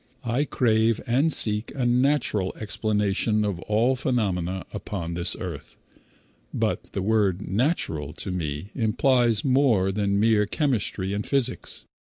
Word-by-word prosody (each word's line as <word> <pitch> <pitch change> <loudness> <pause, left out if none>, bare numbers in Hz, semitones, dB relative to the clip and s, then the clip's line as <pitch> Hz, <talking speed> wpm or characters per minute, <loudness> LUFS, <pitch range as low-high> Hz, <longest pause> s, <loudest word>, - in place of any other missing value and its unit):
I 120 +5 0
crave 115 -4 +2
and 135 +6 +2
seek 105 -4 +2
a 130 -3 -1
natural 120 -6 +1
explanation 105 0 0
of 100 -4 -2
all 110 +7 +1
phenomena 95 -8 -1
upon 95 -5 -5
this 85 +1 0
earth, 85 -6 -7 0.7
but - - -2
the 95 - -2
word 105 -3 +1
"natural" 95 - -1
to 95 - -5
me 80 +1 -4
implies 120 -1 +2
more 125 -8 +3
than 100 0 0
mere 105 -1 +3
chemistry 105 -8 -1
and 105 +1 -2
physics. 130 -3 -1
105 Hz, 130 wpm, -25 LUFS, 95-120 Hz, 0.7 s, more